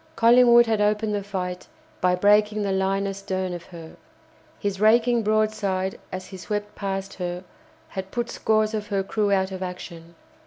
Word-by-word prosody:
Collingwood 240 0 +6
had 220 -2 0
opened 210 +1 +1
the 205 - -1
fight 185 -2 -5 0.3
by 180 0 +3
breaking 210 +2 +3
the 200 - -1
line 195 +1 0
astern 190 -2 -3
of 175 -1 -7
her. 165 -3 -11 0.6
His 200 -1 -3
raking 235 +2 +4
broadside 215 -3 0
as 185 0 -5
he 190 - -10
swept 205 +3 -4
past 195 -1 -4
her 180 0 -5 0.5
had 190 0 -6
put 240 +3 -3
scores 215 0 +1
of 210 -1 -3
her 200 -3 -1
crew 205 +1 -1
out 190 -1 +1
of 190 0 -6
action. 170 -2 -8
195 Hz, 165 wpm, -24 LUFS, 185-215 Hz, 0.6 s, Collingwood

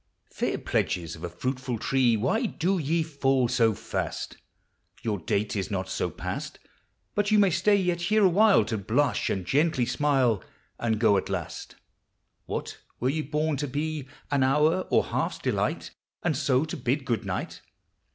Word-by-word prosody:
Fair - - -1
pledges 85 -3 -1
of 80 - -12
a 85 - -3
fruitful 125 +6 -3
tree, 125 0 +2
Why 220 - +1
do 185 0 0
ye 160 +2 +1
fall 135 -5 +1
so 115 -2 +2
fast? - - -4 0.7
Your 105 -3 -1
dale 100 +5 0
is 95 -3 -2
not 95 -2 -3
so - - -1
past - - -5 0.6
But 205 -1 +1
you 215 - +4
may 200 -2 +5
stay 205 +4 +3
ye1 175 -1 0
here 210 +4 +3
awhile 200 +3 +5
To 110 -3 -2
blush 125 +7 +1
and 95 -2 -2
gently 145 - +2
smile. 130 -7 +2 0.4
And 110 -2 0
go 110 -3 +4
;it 95 - -1
lasl. - - -5 0.7
Wha1! - - -4 0.2
were 125 - +1
ye 155 +3 0
born 150 0 -1
to 145 +2 -2
be 150 +1 -3 0.2
An 140 -1 +2
hour 150 +7 +3
or - - +4
half's - - -2
delight. - - -1 0.3
And 160 -4 +1
so 135 0 +2
to 160 - -5
bid 130 +1 -1
good 115 -3 0
nighl - - -4
135 Hz, 170 wpm, -27 LUFS, 115-160 Hz, 0.7 s, may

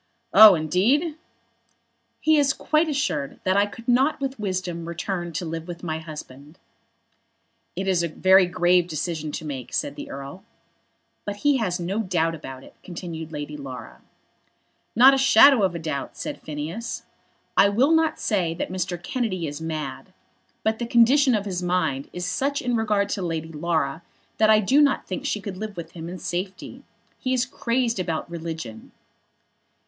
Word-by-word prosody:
"Oh, 215 -3 +10
indeed!" 210 - +1 1.1
"He 315 -1 +4
is 280 -1 +3
quite 310 +3 +1
assured 210 - -2
that 185 0 +1
I 200 +1 +4
could 230 +3 -12
not 265 +5 +3
with 270 -3 -4
wisdom 180 -4 -3
return 175 +1 -4
to 175 - -3
live 165 +1 -5
with 175 0 -8
my 160 -2 -3
husband." 150 -1 -10 1.2
"It 190 +2 -3
is 185 -3 +2
a 170 - 0
very 185 +3 +4
grave 175 0 +3
decision 155 -1 -3
to 160 - -5
make," 135 -5 -6
said 145 - -2
the - - -8
Earl. 140 +7 -8 0.8
"But 205 - -4
he 290 -2 +5
has 185 -7 -1
no 185 +5 -2
doubt 170 -6 0
about 135 -4 -9
it," - - -15
continued 165 -3 -7
Lady 150 -1 -5
Laura. 135 -3 -9 0.9
"Not 260 +4 +8
a 270 - +2
shadow 270 -1 +7
of 180 -3 0
doubt," 140 -4 -4
said 295 - -5
Phineas. 160 +10 -5 0.5
"I 200 - +6
will 250 +9 +3
not 320 -1 +2
say 175 -6 0
that 175 - -4
Mr. 180 -1 -2
Kennedy 200 -9 -2
is 145 +1 -6
mad; 155 -4 -5 0.5
but 220 0 0
the 235 - -3
condition 250 +3 +5
of 205 -1 -2
his 185 -3 -3
mind 175 -7 -1
is 180 0 -4
such 280 +9 -1
in 245 -1 -1
regard 210 -3 +1
to 200 - -2
Lady 165 -2 -3
Laura 160 -1 -1 0.4
that 215 0 +5
I 215 0 +6
do 265 +9 +4
not 285 -2 +2
think 285 - -4
she 215 - -1
could 195 -2 -6
live 215 -1 -6
with 170 - -7
him 165 -1 -8
in 180 - -6
safety. 185 +2 -5 0.4
He 255 -1 0
is 250 0 +1
crazed 235 -3 -1
about 165 -3 -2
religion." 160 -9 -7
185 Hz, 170 wpm, -24 LUFS, 160-230 Hz, 1.2 s, Oh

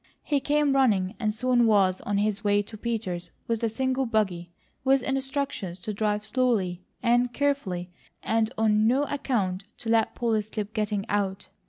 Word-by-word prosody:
He 290 -2 +1
came 290 0 +2
running 205 -8 +3
and 215 -3 +1
soon 240 +1 +2
was 195 -4 +3
on 205 -1 -1
his 205 0 0
way 205 0 +3
to 215 - -10
Peters' 210 -6 -3 0.2
with 230 -1 0
the 230 - +1
single 260 +3 0
buggy, 190 -6 -1 0.3
with 265 -1 +3
instructions 265 -9 -2
to 215 - -4
drive 210 0 -1
slowly 215 -7 +1 0.2
and 245 +1 +3
carefully 230 -11 -1 0.3
and 225 0 +1
on 215 -1 +3
no 260 +5 +3
account 220 -10 -1
to 225 - -6
let 225 -1 +2
Polly 225 -3 +1
slip 210 0 -5
getting 210 -2 -1
out. 200 -2 -1
220 Hz, 165 wpm, -26 LUFS, 200-255 Hz, 0.3 s, running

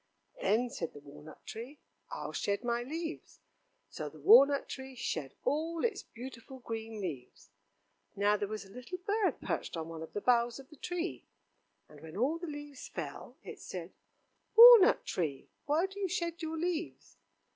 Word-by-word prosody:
"Then," 245 - +2
said 165 - -4
the 145 - -10
walnut 150 +2 -13
tree, 245 +7 -8 0.3
"I'll - - -5
shed 200 +3 -1
my 240 0 0
leaves." 320 +6 -6 0.5
So - - -5
the - - -15
walnut 285 -10 +7
tree 265 0 -7
shed 155 - -3
all 325 +4 0
its 435 -5 -1
beautiful 255 +1 -10
green 225 -3 -6
leaves. 125 - -7 0.6
Now 205 +1 +3
there 205 -1 -2
was 215 -1 -5
a 195 - -16
little 250 - -7
bird 400 +2 0
perched - - -3
on 165 0 -4
one 165 -1 -7
of 160 - -9
the 205 - -3
boughs 235 0 +3
of 270 +1 -12
the - - -12
tree, 355 +4 -4 0.6
and 150 -1 -15
when 160 +3 -9
all 285 +9 +1
the 345 - -5
leaves 290 -2 -8
fell, - - -7
it - - -9
said: - - -7 0.6
"Walnut 465 -3 +10
tree, 150 -7 -3 0.2
why 310 +5 +3
do 390 +1 -8
you 390 - 0
shed 340 -1 -2
your 320 0 -3
leaves?" 340 0 -3
255 Hz, 170 wpm, -32 LUFS, 200-330 Hz, 0.6 s, Walnut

